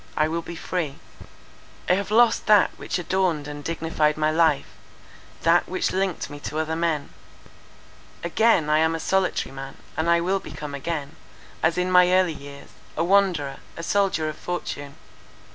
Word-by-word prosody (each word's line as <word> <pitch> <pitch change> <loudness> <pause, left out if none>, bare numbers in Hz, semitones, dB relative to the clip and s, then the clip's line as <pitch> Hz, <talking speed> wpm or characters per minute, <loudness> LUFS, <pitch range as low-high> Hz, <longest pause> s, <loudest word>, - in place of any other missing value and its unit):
I 155 - +3
will 165 +1 -2
be 170 - -8
free. 165 -4 -3 0.9
"I - - +4
have 200 +2 -1
lost 230 +2 +4
that 210 -2 +6
which - - -3
adorned 175 -4 0
and 145 0 -7
dignified 160 -2 0
my 155 0 +2
life; 160 -3 +3 0.8
that - - +3
which - - -1
linked 190 -2 -1
me 145 - -9
to 150 - -5
other 160 0 -1
men. 165 -3 -1 1.1
Again 175 -1 +3
I 155 0 +3
am 160 +1 +2
a - - -4
solitary 190 -3 0
man; 135 0 -8 0.2
and 160 +2 0
I 170 0 +5
will 185 +3 0
become 150 -5 -8
again, 145 0 -4 0.4
as 165 +2 +2
in 180 +1 0
my 180 0 +6
early 185 -2 +3
years, 140 -1 -11 0.3
a - - +2
wanderer, 175 -7 +2 0.2
a 165 - -6
soldier 190 -4 +1
of 155 0 -5
fortune. 145 -5 -5
165 Hz, 165 wpm, -24 LUFS, 150-185 Hz, 1.1 s, that